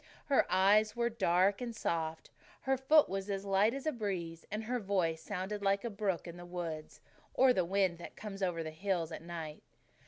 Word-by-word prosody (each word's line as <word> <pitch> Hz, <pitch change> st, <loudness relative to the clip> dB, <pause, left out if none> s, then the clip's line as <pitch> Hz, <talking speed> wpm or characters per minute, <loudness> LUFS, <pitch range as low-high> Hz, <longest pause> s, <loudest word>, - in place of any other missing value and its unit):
Her 275 Hz, -, +3 dB
eyes 210 Hz, +4 st, +4 dB
were 235 Hz, 0 st, +1 dB
dark 195 Hz, -1 st, +2 dB
and 235 Hz, -2 st, -4 dB
soft, 160 Hz, -5 st, -2 dB, 0.3 s
her 265 Hz, 0 st, +1 dB
foot 285 Hz, +4 st, +5 dB
was 195 Hz, +1 st, -4 dB
as 195 Hz, 0 st, -2 dB
light 195 Hz, +3 st, +3 dB
as 275 Hz, -, -6 dB
a 310 Hz, -, +2 dB
breeze, 180 Hz, -, -4 dB
and 210 Hz, +2 st, -3 dB
her 245 Hz, +3 st, -1 dB
voice 185 Hz, -6 st, 0 dB
sounded 205 Hz, +1 st, -4 dB
like 200 Hz, 0 st, +2 dB
a 235 Hz, -, -3 dB
brook 195 Hz, -4 st, -2 dB
in 170 Hz, 0 st, -8 dB
the 175 Hz, -, -9 dB
woods, 165 Hz, -3 st, -6 dB, 0.3 s
or 260 Hz, -1 st, +6 dB
the 185 Hz, -, +2 dB
wind 185 Hz, -2 st, +1 dB
that 170 Hz, -, -9 dB
comes 205 Hz, -2 st, -7 dB
over 175 Hz, -3 st, 0 dB
the 155 Hz, -, -5 dB
hills 170 Hz, 0 st, -1 dB
at -, -, -6 dB
night. 165 Hz, -3 st, -7 dB
195 Hz, 205 wpm, -33 LUFS, 170-215 Hz, 0.3 s, or